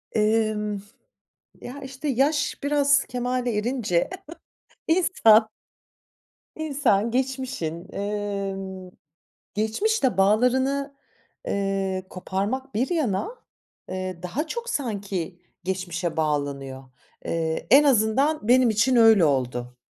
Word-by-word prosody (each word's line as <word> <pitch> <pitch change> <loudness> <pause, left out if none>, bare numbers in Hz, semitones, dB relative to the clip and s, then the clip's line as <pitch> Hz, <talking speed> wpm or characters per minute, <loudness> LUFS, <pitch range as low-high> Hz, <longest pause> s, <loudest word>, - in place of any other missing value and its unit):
Imm. 210 -1 +1 0.8
Ya, 265 +4 -8
işte, 270 +2 -6
yaş 290 +3 +1
biraz 285 -1 +3
kemale 250 -2 -2
erince 210 - 0 0.8
insan 235 - +5 1.1
İnsan 270 -9 +1
geçmişin, 250 - -3
eee, 200 -1 -3 1.0
geçmişle 250 - 0
bağlarını, 260 +8 +2 0.5
eee, 195 -1 -1
koparmak 205 +9 -3
bir 250 +9 0
yana, 310 - 0 0.6
eee, 185 -1 -4
daha 245 - -3
çok 475 +7 -5
sanki 200 - -3 0.3
geçmişe 180 -2 -3
bağlanıyor. 140 -3 -2 0.4
Eee, 160 -1 -2
en 280 +3 +8
azından 265 +1 +2
benim 250 -1 +5
için 230 +4 +2
öyle 225 -6 +7
oldu. 125 -3 -1
220 Hz, 90 wpm, -24 LUFS, 190-265 Hz, 1.1 s, en